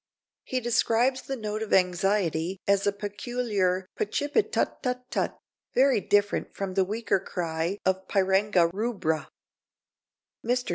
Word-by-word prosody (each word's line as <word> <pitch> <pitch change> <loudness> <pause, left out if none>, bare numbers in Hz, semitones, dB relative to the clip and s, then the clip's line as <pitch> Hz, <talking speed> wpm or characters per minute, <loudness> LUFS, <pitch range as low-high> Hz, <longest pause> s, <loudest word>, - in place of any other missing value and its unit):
He 255 - -1
describes 240 +2 +2
the 270 - -4
note 215 -2 -4
of 220 - -4
anxiety 180 -1 +1
as 200 0 +3
a - - +4
peculiar 205 -2 -1
"pa 430 - 0
chip 290 -6 -3
it 435 0 +3
tut - - -1
tut 250 0 -2
tut," - - -1 0.4
very 260 -4 +4
different 205 +2 +1
from 195 -1 -3
the 190 0 +3
weaker 210 +1 0
cry 170 0 -2
of 190 0 0
Pyranga 190 -2 +3
rubra. 195 -7 -1 1.2
Mr. 245 +2 0
205 Hz, 140 wpm, -27 LUFS, 185-240 Hz, 1.2 s, a